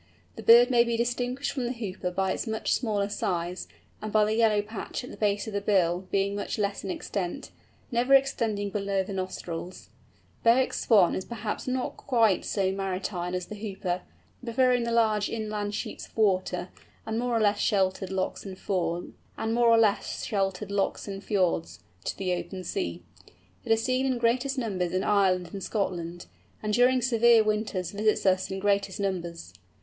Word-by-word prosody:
The - - -7
bird 240 +2 +7
may 240 -1 +6
be 235 -1 -1
distinguished 245 +3 -1
from 260 -3 -3
the 240 - -1
Hooper 195 -6 -4
by 190 +1 0
its - - -3
much 220 0 0
smaller 210 -4 0
size, 180 -3 -2 0.3
and 215 - -4
by 215 0 +4
the 215 - 0
yellow 220 -2 +3
patch 220 +4 -6
at 250 - -8
the - - -8
base 205 -1 0
of 220 - -6
the 200 - -1
bill 185 -3 +1
being 200 0 +1
much 205 - -3
less 200 -1 -1
in 195 - -5
extent, 185 -1 -4 0.4
never 250 +3 +4
extending 225 -7 +1
below 200 -2 0
the 195 - -7
nostrils. 185 -2 -5 0.5
Bewick's 245 +3 +3
Swan 200 -7 +5
is 185 - -2
perhaps 225 +1 -5
not 255 0 -2
quite 225 -7 +2
so 190 -2 0
maritime 185 -2 -3
as 180 -1 -3
the - - -8
Hooper, 195 -4 -3 0.4
preferring 245 0 +2
the 235 - -2
large 215 -3 +2
inland 210 -2 -3
sheets - - -5
of - - -26
water, 185 -3 +1 0.4
and 220 0 -2
more 240 -1 0
or - - +2
less 205 -1 +2
sheltered 190 -1 +1
lochs 190 -1 -2
and 190 -2 -8
fjords, 175 -3 -2 2.9
to - - -3
the 185 -2 -1
open 185 +1 -5
sea. 85 - -3 0.6
It - - -3
is 225 0 +3
seen 260 +1 +1
in 260 -2 0
greatest 250 +4 +1
numbers 190 -8 -1
in 185 - +1
Ireland 185 -4 +2
and 195 -1 -5
Scotland, 175 -4 -3 0.4
and 210 0 -1
during 250 +2 +4
severe 235 -2 +5
winters 210 -4 -1
visits 210 +1 +1
us 185 0 +2
in 190 - -3
greatest 200 0 0
numbers. 170 - -3
205 Hz, 165 wpm, -27 LUFS, 185-230 Hz, 2.9 s, bird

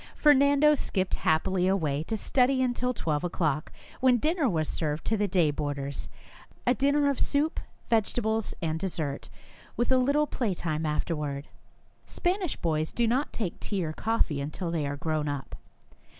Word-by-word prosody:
Fer 295 -1 +6
nando 285 +2 +5
skipped 190 -9 -1
happily 180 +3 +1
away 155 -7 +1
to 220 - -2
study 260 +4 +2
until 250 0 0
twelve 155 -10 -2
o'clock, 155 -4 -1 0.3
when 255 -2 +5
dinner 310 +2 +1
was 160 -5 0
served 155 -1 -2
to 225 - +1
the 210 -1 +1
day 175 -5 +3
boarders, 140 -1 -3 0.6
a 245 - +4
dinner 285 +2 +2
of 280 -2 0
soup, 295 +2 +1 0.3
vegetables, 220 0 0
and 160 0 -1
dessert, 160 -6 -3 0.5
with 240 - +1
a 260 - +5
little 285 +4 +3
playtime 170 - -2
afterward. 150 -2 -2 0.6
Spanish 360 -2 -1
boys 155 -1 -1
do 240 - +1
not 255 +6 +1
take 205 -7 -4
tea 195 -5 -2
or 155 - -3
coffee 190 -9 0
until 155 +4 -4
they 155 -4 -1
are 140 0 -3
grown 155 0 -1
up. 145 -2 -5
190 Hz, 160 wpm, -28 LUFS, 155-255 Hz, 0.6 s, Fer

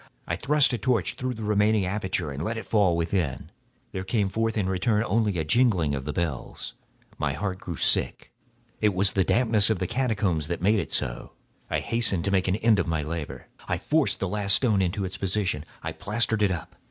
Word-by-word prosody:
I - - -1
thrust 140 -2 +3
a 120 - -1
torch 120 -8 +1
through 130 -1 -4
the 110 - -7
remaining 105 -1 +2
aperture 95 -5 -2
and 70 +3 -5
let 115 +4 -2
it 110 - -6
fall 100 -6 +3
within. 85 -4 -2 0.4
There 95 - -4
came 100 0 0
forth 115 +2 -1
in 100 -3 0
return 105 +4 +1
only 105 -3 +1
a 80 - -1
jingling 90 - +2
of 70 -1 -3
the 75 - -2
bells. 75 -4 -4 0.5
My 70 -2 0
heart 95 +4 -3
grew 85 - -6
sick—on - - +1 0.6
account 90 -2 -4
of - - +3
the 95 - +3
dampness 110 0 +3
of 110 - +1
the 90 - -2
catacombs. 100 - 0
I 90 - -2
hastened 115 -7 +1
to 100 - 0
make 95 -1 +2
an 95 - +2
end 110 -1 +3
of 85 - 0
my 80 -2 -1
labor. 80 -1 -5 0.2
I - - 0
forced - - +1
the - - -1
last 100 -1 +3
stone 110 -7 +2
into 95 +2 -1
its 95 0 -5
position; 95 -5 -1 0.2
I - - -3
plastered 110 +2 -1
it 105 - +4
up. 85 -5 -5
100 Hz, 200 wpm, -26 LUFS, 85-110 Hz, 0.6 s, it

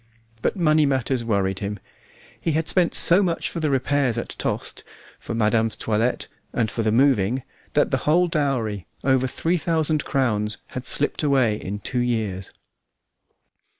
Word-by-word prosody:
But - - 0
money 155 -3 +3
matters 130 -2 0
worried 100 -4 0
him. 105 +1 -4 0.6
He 165 - 0
had 160 +1 0
spent 180 -2 +2
so 180 +4 +6
much 175 -4 -1
for - - -4
repairs 140 -4 +1
at 120 - -4
Tostes, - - -4 0.4
for - - -5
madame's 110 0 +1
toilette, 115 +3 -1 0.3
and 110 -4 0
for 115 - -2
the 110 -1 +1
moving, 125 -1 +2 0.3
that - - +2
the - - +2
whole 175 +3 +4
dowry, 130 - -1 0.2
over 130 -1 +2
three 165 +7 -1
thousand 155 -2 0
crowns, 105 -5 0
had 125 0 -6
slipped 145 - +2
away 135 -7 +2
in 105 0 -6
two 125 +5 -2
years. 110 -6 -2
125 Hz, 150 wpm, -23 LUFS, 110-150 Hz, 0.6 s, so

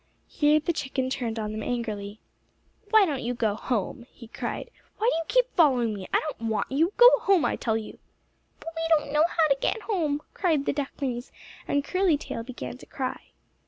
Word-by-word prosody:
Here 300 +1 +3
the 325 +3 -1
chicken 265 -3 -2
turned 235 -4 -2
on 215 -1 -3
them 215 0 -4
angrily. 215 -3 -4 0.7
"Why 435 -1 +6
don't 285 -7 -2
you 245 +1 -2
go 220 -3 +1
home?" 235 +1 -3
he 230 - -13
cried. - - -5 0.3
"Why 440 - 0
do - - +3
you 330 - -1
keep - - +2
following 255 - +4
me? 195 -2 -7
I - - +4
don't 235 -7 -4
want 215 +1 -1
you. 320 +7 +2
Go 485 +1 +8
home 390 -5 +3
I - - +1
tell 220 -2 0
you." 220 - -8 0.6
"But - - -7
we 325 - -3 0.2
don't 295 -1 -6
know 300 +2 +5
how 320 -2 +3
to 275 - +3
get 445 - 0
home," 310 -9 -1
cried 315 -7 +1
the - - +1
ducklings, 270 -3 -4 0.4
and 285 0 +1
Curly 365 0 +2
Tail 230 - -6
began 250 +1 -7
to - - -14
cry. 260 -1 -5
275 Hz, 200 wpm, -26 LUFS, 230-325 Hz, 0.7 s, Go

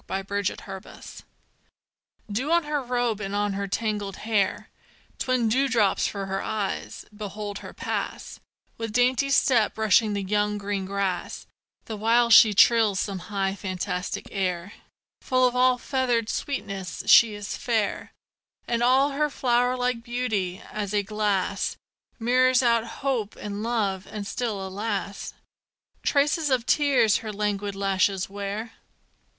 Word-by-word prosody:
MY 195 0 -3
LADY 200 -1 -1
APRIL 195 -1 -10 1.3
Dew 255 +10 -1
on 340 0 +4
her 295 -1 -1
robe 245 -4 -1
and 195 0 -3
on 205 0 0
her 200 0 -3
tangled 205 -1 -2
hair; 215 -3 0 0.5
Twin 255 -3 +1
dewdrops 235 -4 +2
for 200 -1 -4
her 195 0 -2
eyes; 210 -3 -4
behold 205 -1 -6
her - - -9
pass, - - -4 0.4
With 225 -2 -4
dainty 250 +3 +2
step 245 -5 +3
brushing 220 0 +3
the 200 -1 -2
young, 210 +1 0
green 200 -1 -3
grass, 195 -2 -3 0.4
The 220 - -5
while 235 +2 +3
she 215 -2 +8
trills 220 -2 +5
some 195 -2 -2
high, 195 -2 0
fantastic 185 -2 -4
air, 185 -1 -2 0.5
Full 255 -1 +3
of 250 - -3
all 255 0 +4
feathered 245 -3 0
sweetness: 195 - -4
she 225 -3 +7
is 205 -1 -5
fair, 225 -4 -1 0.6
And 235 0 0
all 265 +4 +4
her 300 +2 0
flower 245 -2 +1
like 250 -1 -1
beauty, 220 -7 -2
as 210 -1 -3
a 205 - +2
glass, 200 -1 -1 0.4
Mirrors 255 +2 +3
out 235 -1 +3 0.2
hope 240 -7 -1
and 205 0 -6
love: 205 -5 -1
and 205 -1 -5
still, 210 -3 -3
alas! 200 +1 -4 0.7
Traces 290 +2 +2
of 255 -3 +1
tears 255 -7 +3
her 220 -1 -6
languid 205 -1 -2
lashes 195 -1 +1
wear. 205 +3 -5
215 Hz, 140 wpm, -25 LUFS, 200-245 Hz, 1.3 s, she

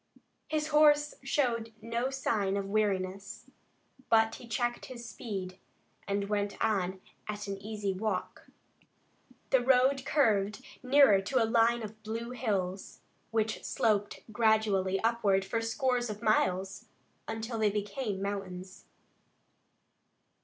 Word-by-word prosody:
His 305 0 -1
horse 295 -1 +5
showed 240 -5 0
no 235 +3 -2
signs 210 -7 0
of 200 - -2
weariness, 195 -1 -2 0.6
but 225 0 +4
he 240 - -10
checked 240 +1 -2
his 240 -2 -8
speed, 190 -6 -6 0.5
and 200 0 -1
went 205 -1 -1
on 190 -4 0 0.3
at 205 -1 -5
an 195 0 -4
easy 205 -2 -3
walk. 190 -1 -3 1.0
The 265 - +6
road 260 +2 +3
curved 210 -8 +1 0.2
nearer 255 -6 +6
to 230 +5 +1
a - - +3
line 230 +1 +3
of 215 0 -9
blue 225 +2 -5
hills, 200 -6 -3 0.3
which 220 -1 -1
sloped 210 -2 0
gradually 210 -4 +2
upward 210 -4 +2
for 225 +4 -1
scores 245 +1 0
of 210 +1 -6
miles, 190 -3 +1 0.4
until 225 +1 -4
they 215 -1 +3
became 205 0 -3
mountains. 190 -2 -5
220 Hz, 120 wpm, -30 LUFS, 200-235 Hz, 1.0 s, The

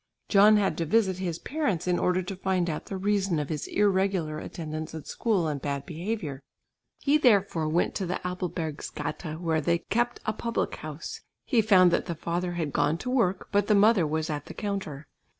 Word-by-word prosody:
John 210 +1 +7
had 200 -4 0
to 165 - 0
visit 190 -1 +2
his 175 -3 -2
parents 235 - -2
in 180 -1 +2
order 180 +1 +1
to 190 +2 -5
find 185 -2 0
out 155 - -6
the 195 - -4
reason 195 -2 +1
of 150 -2 -2
his 155 -3 -3
irregular 190 -6 +1
attendance 155 -1 -6
at 160 - -7
school 200 -8 0
and 145 -3 -3
bad 140 -1 -3
behaviour. 165 -5 -4 0.6
He 295 +2 +2
therefore 200 - +3
went 170 +3 +1
to 190 - -3
the 180 - -2
Apelbergsgata 165 -2 -4
where 165 -2 0
they 170 +3 +2
kept 240 +7 -1
a 215 - 0
public 235 +2 -2
house. 155 0 -7 0.2
He 240 -5 +3
found 185 -4 +6
that - - 0
the 170 - -3
father 175 +2 -2
had 160 -5 -3
gone 155 +3 +2
to 250 +7 -4
work, 205 -8 +1
but 205 -1 +2
the 210 - +4
mother 200 -4 +5
was 155 +2 -1
at 145 -1 -4
the - - -9
counter. 195 -9 -4
180 Hz, 195 wpm, -27 LUFS, 160-205 Hz, 0.6 s, John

